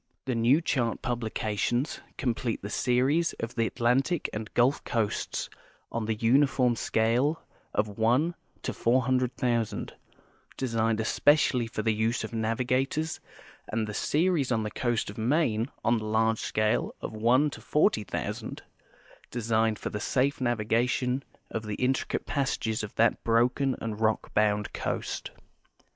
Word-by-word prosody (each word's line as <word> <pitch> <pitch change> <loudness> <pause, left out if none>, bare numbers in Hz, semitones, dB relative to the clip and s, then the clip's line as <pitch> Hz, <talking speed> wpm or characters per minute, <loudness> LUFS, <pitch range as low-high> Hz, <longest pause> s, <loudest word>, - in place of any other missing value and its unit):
The 130 - -1
new 120 +7 +4
chart 120 -8 -1
publications 120 +1 -1 0.2
complete 120 -4 -2
the 100 - -5
series 130 +9 +2
of 115 +1 -5
the 115 -1 +1
Atlantic 130 +7 +1
and 105 +1 -5
Gulf 125 +4 +3
coasts 110 -3 -1 0.4
on 115 -1 -2
the 110 0 0
uniform 125 +2 +3
scale 120 +9 +1 0.3
of 105 - +1
1: 125 +10 +3 0.3
400,000, 125 -2 0 0.6
designed 115 -3 0
especially 125 +1 +3
for 110 -1 -4
the 110 - +2
use 110 +3 0
of - - -6
navigators, 125 +7 0 0.5
and 110 0 -1
the 105 - -6
series 155 - +1
on 110 -2 +1
the 105 - -3
coast 120 -3 -1
of 105 - -14
INIaine 115 -2 +1 0.2
on 120 0 +3
the 110 - -6
large 110 +1 +2
scale 110 0 0
of - - -6
1: 125 +7 +3
40,000, 150 - -1 0.7
designed 110 -2 +1
for - - -5
the 105 - -3
safe 135 +5 0
navigation 120 +3 +1 0.3
of 110 -1 -4
the 105 - -2
in 130 +3 +2
tricate - - -3
jjassages 115 -6 -1
of 110 - -7
that 115 0 +2
broken 125 +3 +2
and 110 -1 -4
rock 110 0 0
bound 105 -1 +1
coast. - - -3
120 Hz, 135 wpm, -28 LUFS, 110-130 Hz, 0.7 s, new